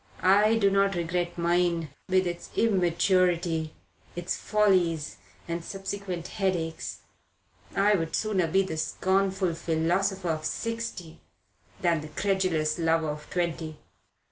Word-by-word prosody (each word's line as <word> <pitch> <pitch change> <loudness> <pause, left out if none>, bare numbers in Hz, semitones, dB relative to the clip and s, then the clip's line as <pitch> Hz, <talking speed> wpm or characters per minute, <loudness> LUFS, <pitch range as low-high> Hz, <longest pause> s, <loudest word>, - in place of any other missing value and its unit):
I 205 +4 +5
do 200 -3 +3
not 195 0 +3
regret 175 +1 -2
mine, 170 -1 +1 0.2
with 185 0 +3
its 175 -1 -4
immaturity, 175 -4 +2 0.4
its 175 0 -2
follies 180 -7 +1 0.3
and 170 0 -3
subsequent 195 -2 -5
headaches. 180 -6 -2 0.7
I 205 +1 +4
would 165 -4 0
sooner 200 -6 +1
be 190 +4 +3
the 160 -4 -5
scornful 190 +2 +1
philosopher 175 +3 0
of 155 -1 -1
sixty 230 -3 -4 0.6
than 170 -3 +2
the 155 - -7
credulous 175 -2 0
lover 165 -1 +2
of 150 0 -6
twenty." 165 -3 -2
175 Hz, 115 wpm, -27 LUFS, 165-195 Hz, 0.7 s, I